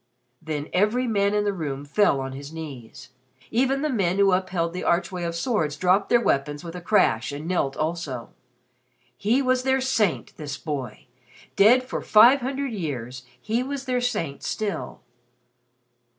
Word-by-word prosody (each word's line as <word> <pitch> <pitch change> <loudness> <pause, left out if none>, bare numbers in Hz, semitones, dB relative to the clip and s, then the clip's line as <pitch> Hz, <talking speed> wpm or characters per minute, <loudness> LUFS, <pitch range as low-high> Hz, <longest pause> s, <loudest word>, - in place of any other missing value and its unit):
Then 155 -2 -4
every 215 +7 +2
man 205 -3 +1
in 210 - +2
the 205 -1 0
room 145 -6 -4
fell 145 -1 +2
on 135 0 -5
his 140 +2 -8
knees. 135 -5 -9 0.4
Even 265 +4 +1
the 305 - +1
men 190 -6 0
who 200 -1 +4
had 185 - +4
upheld 170 -3 -2
the 180 - -4
archway 180 +1 0
of 170 0 -3
swords 170 - -1
dropped 185 +4 +2
their 240 - +5
weapons 145 -6 0
with 170 0 -8
a 180 - -6
crash 150 - +2
and 145 +3 -6
knelt 160 -7 -1
also. 155 -7 -3 0.8
He 235 +7 +1
was 255 0 +2
their 265 +1 +2
saint 230 -9 0
this 145 -3 -5
boy! 135 -9 -5 0.5
Dead 240 +6 +6
for 255 - -4
five 245 +6 +6
hundred 270 0 -3
years, 130 - -5
he 225 +3 -1
was 270 +1 -4
their 250 -2 0
saint 205 - -2
still. 215 -3 -4
185 Hz, 165 wpm, -24 LUFS, 150-235 Hz, 0.8 s, Dead